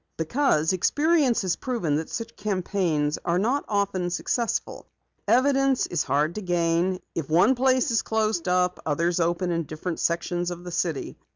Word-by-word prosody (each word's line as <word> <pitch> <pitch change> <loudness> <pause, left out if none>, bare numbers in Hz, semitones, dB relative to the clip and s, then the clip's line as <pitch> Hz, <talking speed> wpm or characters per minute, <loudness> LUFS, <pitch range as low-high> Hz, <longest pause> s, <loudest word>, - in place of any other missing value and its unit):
"Because 165 - +1
experience 290 - +2
has 185 -2 0
proven 195 - -1
that 160 - -4
such 230 0 -5
campaigns 180 -7 -1
are 170 0 +1
not 245 +9 0
often 200 -4 0
successful. 230 +6 -2 0.4
Evidence 270 0 +3
is 170 -3 -1
hard 150 +4 0
to 215 - -5
gain. 175 0 0
If 155 -4 -4
one 175 +11 +5
place 260 +1 +2
is 225 - +2
closed 215 -5 -1
up, 180 0 +1
others 170 +3 0
open 175 +2 0
in 170 -1 -1
different 160 +3 -5
sections 175 +1 -1
of 175 0 -7
the 175 - -7
city. 165 -4 -3
180 Hz, 160 wpm, -25 LUFS, 170-225 Hz, 0.4 s, one